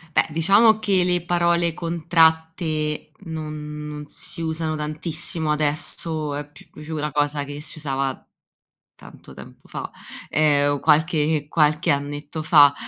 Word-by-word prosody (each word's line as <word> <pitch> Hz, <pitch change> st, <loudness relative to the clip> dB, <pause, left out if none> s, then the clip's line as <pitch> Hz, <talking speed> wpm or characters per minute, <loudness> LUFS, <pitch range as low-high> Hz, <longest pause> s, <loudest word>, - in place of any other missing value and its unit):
Beh, -, -, +4 dB
diciamo 200 Hz, +8 st, +4 dB
che 195 Hz, -4 st, +2 dB
le 180 Hz, -1 st, +1 dB
parole 170 Hz, -1 st, +2 dB
contratte 160 Hz, -2 st, +1 dB
non 150 Hz, -3 st, -6 dB
non 150 Hz, 0 st, -7 dB
si 165 Hz, -, -6 dB
usano 160 Hz, -1 st, -2 dB
tantissimo, 155 Hz, +1 st, -2 dB
adesso 150 Hz, 0 st, 0 dB
è 145 Hz, 0 st, -6 dB
più 145 Hz, -, -17 dB
più 155 Hz, +1 st, -8 dB
una 150 Hz, 0 st, -2 dB
cosa 145 Hz, 0 st, 0 dB
che 145 Hz, +1 st, -8 dB
si 155 Hz, -, -8 dB
usava 135 Hz, -2 st, -1 dB, 0.8 s
tanto -, -, -14 dB
tempo -, -, -13 dB
fa, -, -, -6 dB, 0.4 s
ehm, 145 Hz, -2 st, +3 dB
o 145 Hz, -, -2 dB
qualche 155 Hz, -1 st, +2 dB
qualche 150 Hz, +1 st, +2 dB
annetto 145 Hz, +2 st, -4 dB
fa, 145 Hz, -3 st, +6 dB
155 Hz, 135 wpm, -22 LUFS, 150-165 Hz, 0.8 s, fa